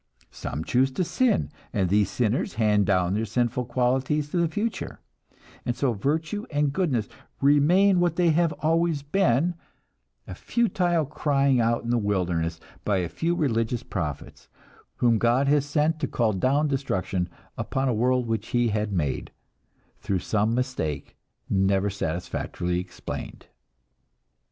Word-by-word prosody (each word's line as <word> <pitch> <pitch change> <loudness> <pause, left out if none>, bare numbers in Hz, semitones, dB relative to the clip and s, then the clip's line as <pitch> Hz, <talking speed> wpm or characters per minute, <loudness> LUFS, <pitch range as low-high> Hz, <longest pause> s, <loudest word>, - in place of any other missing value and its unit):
Some 75 - -5
choose 130 +8 +2
to 185 - 0
sin, 225 +1 +1 0.2
and 100 -5 +1
these 100 +1 +2
sinners 110 +4 -1
hand 105 -3 +2
down 90 -2 +2
their 110 +2 0
sinful 120 +3 0
qualities 130 +5 0
to - - -1
the 170 -1 +3
future; 210 +8 -3 0.6
and 120 - -1
so 130 -2 +1
virtue 160 - -2
and 145 -2 0
goodness 140 - 0 0.3
remain 175 +8 +4
what 175 -2 +2
they 175 -1 +3
have 165 +1 +2
always 165 -2 +1
been, 170 0 +2 0.7
a - - -7
futile 180 -8 +1
crying 140 -3 +2
out 115 +1 +1
in 120 - -2
the 120 - +2
wilderness 90 -5 -1 0.2
by 100 -2 +1
a 90 -2 -1
few 170 - -1
religious 120 -5 0
prophets, 75 - -5 0.5
whom 115 -2 +3
God 120 +5 +3
has 145 -1 +3
sent 155 +2 +1
to 145 - -1
call 115 -4 +1
down 135 +10 +2
destruction 95 -10 -1 0.3
upon 135 0 -1
a 125 - +2
world 125 +2 +2
which 110 -1 -2
He 120 -1 +1
had 105 0 -1
made 75 -8 -1 0.7
through 95 - -1
some 110 +4 0
mistake 125 - -3 0.3
never 95 +1 +2
satisfactorily 90 0 -3
explained! 90 -1 -7
125 Hz, 145 wpm, -25 LUFS, 100-150 Hz, 0.7 s, remain